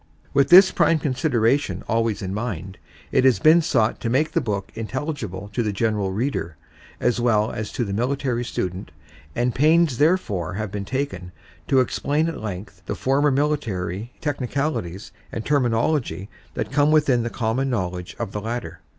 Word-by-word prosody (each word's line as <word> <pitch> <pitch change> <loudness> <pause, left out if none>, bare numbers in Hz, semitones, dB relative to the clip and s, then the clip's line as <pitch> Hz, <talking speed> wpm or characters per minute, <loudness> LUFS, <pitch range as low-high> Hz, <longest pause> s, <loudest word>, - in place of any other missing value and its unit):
With 140 -1 +3
this 190 +2 +9
prime 165 - +3
consideration 130 - 0
always 115 -2 0
in 95 0 -3
mind, 100 -4 -4 0.3
it - - +3
has 130 -2 +5
been 165 +2 +6
sought 115 -8 +1
to 115 - -2
make 140 +6 +1
the 165 - +1
book 100 -5 -3
intelligible 110 - -5
to 120 - 0
the 110 -2 0
general 105 -2 0
reader 100 - -2 0.4
as 125 -1 +1
well 110 -3 +2
as 105 -1 -5
to 120 - -1
the 100 - -4
military 125 +2 -1
student 90 -5 -4 0.5
and 120 0 +1
pains 155 -1 +3
therefore 105 - +1
have 105 -1 -3
been 100 -1 -4
taken 130 -8 -3 0.4
to 135 -1 +4
explain 145 +5 0
at 165 - -4
length 100 -2 -6
for - - -27
the - - -2
former 140 +3 +2
military 120 - -1
technicalities 135 - -2 0.2
and 115 - -5
terminology 120 - 0 0.3
that - - -3
come 145 +1 +3
within 150 -6 +3
the 120 - -2
common 120 +4 -1
knowledge 90 -6 -3
of - - -4
the 105 - -4
latter. 115 -5 -5
120 Hz, 170 wpm, -23 LUFS, 100-140 Hz, 0.5 s, this